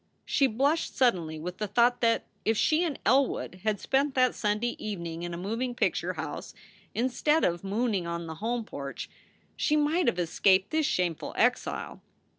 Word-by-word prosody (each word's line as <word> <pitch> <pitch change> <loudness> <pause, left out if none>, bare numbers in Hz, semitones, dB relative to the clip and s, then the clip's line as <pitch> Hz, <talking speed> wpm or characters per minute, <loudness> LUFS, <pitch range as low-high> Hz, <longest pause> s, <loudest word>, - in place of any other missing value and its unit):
She 275 - +3
blushed 280 +8 0
suddenly 175 -11 +2
with 180 +3 -6
the 210 - -1
thought 240 +4 +3
that 230 -1 +2 0.2
if 220 0 +1
she 315 +8 +3
and 315 -6 -2
Elwood 260 -8 +2
had 215 -2 0
spent 275 +4 +1
that 255 -1 +4
Sunday 210 +3 -1
evening 170 -6 -4
in 175 0 -4
a 170 - -5
moving 230 +7 -3
picture - - 0
house, - - -6 0.4
instead 260 +6 +1
of 175 0 0
mooning 200 -2 -1
on 170 0 -3
the 160 - -6
home 235 +1 -1
porch, 140 -6 -7 0.4
she 300 - +1
might 305 +4 +2
have - - +2
escaped 185 +3 +2
this 315 -1 +2
shameful 175 - -1
exile. - - 0
220 Hz, 170 wpm, -28 LUFS, 180-260 Hz, 0.4 s, that